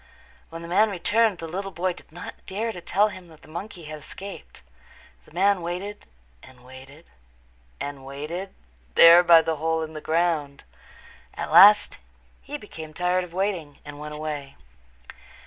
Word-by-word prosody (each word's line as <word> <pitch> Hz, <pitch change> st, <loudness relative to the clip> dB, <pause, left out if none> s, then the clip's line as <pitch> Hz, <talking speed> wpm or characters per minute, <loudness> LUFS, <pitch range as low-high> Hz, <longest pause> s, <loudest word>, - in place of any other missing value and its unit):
When 165 Hz, 0 st, -8 dB
the -, -, -7 dB
man 205 Hz, +5 st, +3 dB
returned 210 Hz, +2 st, +2 dB
the 165 Hz, -, -7 dB
little 195 Hz, +4 st, -4 dB
boy 185 Hz, 0 st, -2 dB
did -, -, -17 dB
not 175 Hz, +3 st, -8 dB
dare 220 Hz, +4 st, -2 dB
to 180 Hz, -, -9 dB
tell 205 Hz, +5 st, +2 dB
him 185 Hz, -3 st, -11 dB
that 160 Hz, -2 st, -18 dB
the -, -, -15 dB
monkey 170 Hz, +2 st, -8 dB
had 155 Hz, 0 st, -8 dB
escaped. 195 Hz, -, -10 dB, 0.6 s
The -, -, -20 dB
man 190 Hz, +3 st, +2 dB
waited 180 Hz, +5 st, -6 dB, 0.3 s
and 125 Hz, -1 st, -17 dB
waited 135 Hz, +5 st, -14 dB, 0.7 s
and 140 Hz, -1 st, -6 dB
waited 150 Hz, +8 st, -6 dB, 0.4 s
there 170 Hz, +1 st, +9 dB
by 170 Hz, -2 st, +6 dB
the 160 Hz, -1 st, -2 dB
hole 160 Hz, +1 st, -1 dB
in 160 Hz, 0 st, -7 dB
the 155 Hz, -, -7 dB
ground. 160 Hz, -4 st, -1 dB, 0.7 s
At -, -, -5 dB
last 205 Hz, +1 st, +7 dB, 0.4 s
he 290 Hz, +2 st, -6 dB
became 160 Hz, -, -10 dB
tired 180 Hz, +1 st, +1 dB
of 180 Hz, -, -10 dB
waiting 185 Hz, -7 st, -2 dB
and 145 Hz, 0 st, -9 dB
went 150 Hz, 0 st, -7 dB
away. 150 Hz, -3 st, -6 dB
170 Hz, 165 wpm, -24 LUFS, 155-190 Hz, 0.7 s, there